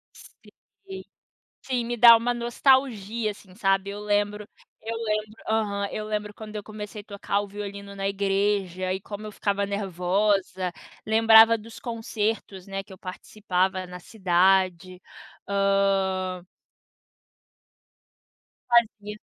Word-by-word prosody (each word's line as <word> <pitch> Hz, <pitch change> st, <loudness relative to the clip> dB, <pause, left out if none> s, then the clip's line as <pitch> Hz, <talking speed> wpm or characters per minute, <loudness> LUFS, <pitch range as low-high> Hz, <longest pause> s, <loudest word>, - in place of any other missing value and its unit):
Sim, 385 Hz, -1 st, -14 dB, 0.6 s
sim, 250 Hz, -3 st, -1 dB
me 240 Hz, +1 st, -3 dB
dá 235 Hz, 0 st, +10 dB
uma 240 Hz, +2 st, -1 dB
nostalgia, 235 Hz, -3 st, +1 dB
assim, 190 Hz, -2 st, -16 dB
sabe. 195 Hz, -2 st, +1 dB
Eu 205 Hz, -, -7 dB
lembro 205 Hz, 0 st, -1 dB, 0.3 s
eu 225 Hz, +1 st, -4 dB
lembro 215 Hz, -1 st, -2 dB
aham, 205 Hz, -2 st, 0 dB
eu 215 Hz, -, -4 dB
lembro 210 Hz, -1 st, -3 dB
quando 215 Hz, 0 st, -10 dB
eu 210 Hz, -, -4 dB
comecei 210 Hz, 0 st, -8 dB
tocar 200 Hz, 0 st, -2 dB
o 205 Hz, -, -7 dB
violino 200 Hz, 0 st, -7 dB
na 195 Hz, 0 st, -3 dB
igreja 195 Hz, -2 st, 0 dB
e 190 Hz, -, -4 dB
como 210 Hz, +1 st, -7 dB
eu -, -, -7 dB
ficava 200 Hz, 0 st, -1 dB
nervosa, 190 Hz, -1 st, 0 dB, 0.3 s
lembrava 225 Hz, +1 st, +7 dB
dos 225 Hz, +1 st, -12 dB
concertos, 220 Hz, -5 st, -3 dB
né, 195 Hz, 0 st, -4 dB
que 195 Hz, -, -14 dB
eu -, -, -13 dB
participava 185 Hz, 0 st, -2 dB
na 180 Hz, 0 st, -9 dB
cidade. 185 Hz, -2 st, +1 dB, 0.5 s
Hã 195 Hz, -2 st, +1 dB, 2.2 s
Fazia. 215 Hz, -3 st, +2 dB
205 Hz, 120 wpm, -25 LUFS, 195-220 Hz, 2.2 s, dá